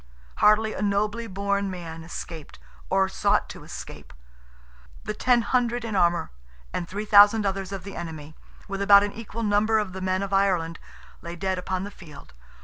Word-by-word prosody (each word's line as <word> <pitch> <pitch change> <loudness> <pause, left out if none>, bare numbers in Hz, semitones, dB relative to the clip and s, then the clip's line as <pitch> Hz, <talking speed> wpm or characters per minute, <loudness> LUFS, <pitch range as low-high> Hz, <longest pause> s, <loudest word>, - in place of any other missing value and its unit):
Hardly 215 +1 +4
a - - -5
nobly 210 +3 0
born 200 0 -1
man 165 -3 -7
escaped, 165 -2 -8 0.3
or 190 0 +3
sought 190 - +1
to - - -9
escape. - - -10 0.9
The - - -3
ten 245 -2 +2
hundred 240 +1 0
in 220 -2 -3
armour, 175 - +2 0.4
and 175 - -3
three 205 +2 -4
thousand 205 +1 +7
others 195 -1 -2
of 195 -3 -5
the 195 +1 -8
enemy, 155 -2 -7 0.3
with 195 -1 -4
about 200 0 +7
an 205 - -3
equal 230 +1 -6
number 210 +1 +2
of 210 -4 -2
the 190 - -6
men 185 +1 0
of 200 0 -5
Ireland, 180 -4 +1 0.4
lay 170 0 -7
dead 190 +1 -2
upon 185 +1 -3
the 205 - -6
field. 155 - -14
195 Hz, 175 wpm, -25 LUFS, 180-210 Hz, 0.9 s, thousand